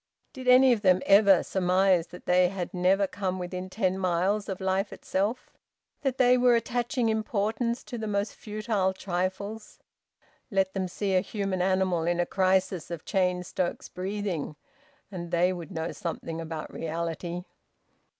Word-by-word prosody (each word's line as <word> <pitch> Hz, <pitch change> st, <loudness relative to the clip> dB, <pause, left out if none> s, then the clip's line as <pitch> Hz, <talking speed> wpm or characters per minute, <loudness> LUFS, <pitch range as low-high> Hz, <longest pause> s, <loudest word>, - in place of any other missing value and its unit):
Did 260 Hz, -3 st, -8 dB
any 255 Hz, 0 st, +7 dB
of 220 Hz, -, -2 dB
them 185 Hz, -2 st, +4 dB
ever 200 Hz, -2 st, +6 dB
surmise 185 Hz, -1 st, +2 dB
that 180 Hz, -, -12 dB
they 180 Hz, 0 st, +4 dB
had 185 Hz, -2 st, -5 dB
never 190 Hz, +2 st, +3 dB
come 190 Hz, -1 st, -3 dB
within 180 Hz, +1 st, -5 dB
ten 190 Hz, -1 st, 0 dB
miles 190 Hz, +3 st, 0 dB
of 190 Hz, -, -4 dB
life 190 Hz, +1 st, 0 dB
itself, 205 Hz, +6 st, -2 dB, 0.5 s
that 270 Hz, -2 st, -1 dB
they 250 Hz, 0 st, +5 dB
were 245 Hz, -1 st, +5 dB
attaching 240 Hz, +2 st, 0 dB
importance 220 Hz, +2 st, -1 dB
to 240 Hz, -, -7 dB
the 220 Hz, -, -3 dB
most 200 Hz, 0 st, -1 dB
futile 210 Hz, -3 st, -1 dB
trifles? 190 Hz, +3 st, -4 dB, 0.7 s
Let 195 Hz, -3 st, +1 dB
them 190 Hz, -2 st, -1 dB
see 195 Hz, +1 st, -1 dB
a 185 Hz, -, +4 dB
human 195 Hz, -2 st, -2 dB
animal 185 Hz, -3 st, +1 dB
in 175 Hz, 0 st, +1 dB
a 175 Hz, -, +2 dB
crisis 185 Hz, -2 st, +1 dB
of 170 Hz, -2 st, -6 dB
Cheyne 180 Hz, -2 st, +1 dB
Stokes 180 Hz, 0 st, -3 dB
breathing, 185 Hz, -5 st, -3 dB, 0.6 s
and 175 Hz, -3 st, -6 dB
they 175 Hz, +2 st, +2 dB
would 175 Hz, -2 st, -7 dB
know 165 Hz, -3 st, -3 dB
something 165 Hz, -1 st, -5 dB
about 160 Hz, -1 st, -6 dB
reality! 170 Hz, +2 st, -4 dB
190 Hz, 155 wpm, -27 LUFS, 180-210 Hz, 0.7 s, any